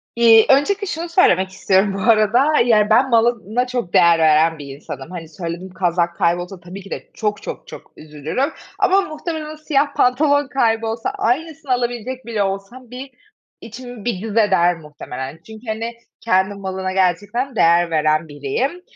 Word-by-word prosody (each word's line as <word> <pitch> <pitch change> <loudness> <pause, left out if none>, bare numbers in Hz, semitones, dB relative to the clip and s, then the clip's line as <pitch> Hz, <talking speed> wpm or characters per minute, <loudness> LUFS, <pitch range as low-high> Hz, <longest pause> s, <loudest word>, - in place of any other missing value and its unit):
İii, 230 -2 +6
öncelikle 395 +10 +2
şunu 340 0 -4
söylemek 190 - +3
istiyorum 190 +1 +1
bu 195 - -4
arada, 230 +7 +3
yani, 215 -3 +3
ben 245 +5 +4
malına 235 0 +1
çok 245 -8 -4
değer 170 -1 +5
veren 160 0 +3
bir 140 -1 -8
insanım. 140 +1 -9
Hani, 165 -3 -8
söylediğim 170 +3 -7
kazak 170 -1 0
kaybolsa 175 +3 -1
tabii 180 +3 -10
ki 195 - -13
de - - -7
çok 210 -2 -2
çok - - -7
çok - - -12
üzülürüm 155 - -3 0.3
ama 390 +1 +4
muhtemelen 310 -2 -5
o - - -12
siyah 290 -2 0
pantolon 285 +3 +2
kaybolsa, 225 -3 0
aynısını 290 +3 -2
alabilecek 245 0 -3
bile 225 -3 -1
olsam 195 +6 -6
bir 260 +2 -8 0.5
içim 245 -1 -10
bir 230 -7 -2
cız 220 0 -5
eder 190 -5 +3
muhtemelen. 150 -2 -8
Çünkü, 220 +2 -13
hani, 225 +2 -3 0.3
kendi 190 -2 +1
malına 190 -1 -4
gerçekten 205 +8 0
değer 170 -2 +3
veren 155 0 +1
biriyim. 150 - -3
215 Hz, 160 wpm, -19 LUFS, 175-250 Hz, 0.5 s, İii